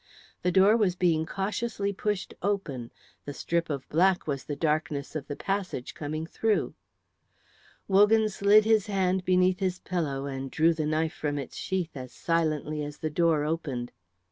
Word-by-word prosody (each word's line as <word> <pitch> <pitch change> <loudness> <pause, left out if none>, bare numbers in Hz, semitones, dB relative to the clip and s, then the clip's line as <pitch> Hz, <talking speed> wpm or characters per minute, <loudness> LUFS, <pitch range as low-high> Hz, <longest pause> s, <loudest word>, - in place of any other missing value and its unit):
The 180 - +1
door 195 +4 +6
was 195 -6 +2
being 165 -3 +1
cautiously 200 +1 -2
pushed 205 -1 -2
open; 165 -12 -2 0.4
the 145 - -6
strip 170 0 -1
of 140 -3 -4
black 180 +3 +3
was 140 -3 -3
the 145 - -4
darkness 150 -1 -1
of 150 -3 -4
the 145 - -4
passage 195 -10 -3
coming 155 +1 -4
through. 215 +5 0 1.1
Wogan 210 +3 +5
slid 210 +1 +4
his 220 -2 +3
hand 190 -2 +1
beneath 185 0 +3
his 185 -2 0
pillow, 150 -8 -2
and 135 -1 -4
drew 165 +5 +3
the 155 -2 -2
knife 155 +1 0
from 145 -1 -2
its 140 - -6
sheath 180 -4 -3
as 130 -2 -7
silently 155 +1 -1
as 145 0 -6
the 155 - -3
door 160 -2 +2
opened. 145 -6 -3
165 Hz, 165 wpm, -28 LUFS, 150-195 Hz, 1.1 s, door